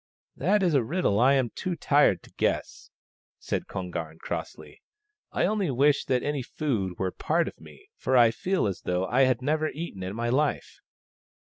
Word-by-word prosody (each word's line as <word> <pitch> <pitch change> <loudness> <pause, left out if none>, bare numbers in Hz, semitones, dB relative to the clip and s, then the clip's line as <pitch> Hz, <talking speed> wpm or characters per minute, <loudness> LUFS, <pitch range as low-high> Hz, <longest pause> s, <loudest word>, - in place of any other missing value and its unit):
" - - -77
That 195 +7 +2
is 175 -3 +2
a 135 -4 +3
riddle 120 - 0
I 130 +3 +5
am 130 -4 +1
too 185 -2 -3
tired 145 - +3
to - - -18
guess," - - -2 0.5
said - - -3
Kon 90 -2 -5
garn 80 -2 -5
crossly. - - -7 0.3
" 420 0 -54
I - - +1
only 205 -5 0
wish 140 +2 +3
that 125 -2 +1
any 145 -2 -1
food 115 - -2
were 95 -1 -1
part 165 - 0
of - - -9
me, 405 +1 -16
for 130 - +1
I 120 -2 +6
feel 185 +11 -1
as 95 -4 -3
though 90 +1 -1
I 130 +7 +3
had 130 -1 0
never 155 +2 +1
eaten 155 - -7
in 95 +2 -4
my 120 +1 -1
life." 145 +4 -1
130 Hz, 200 wpm, -27 LUFS, 105-155 Hz, 0.5 s, I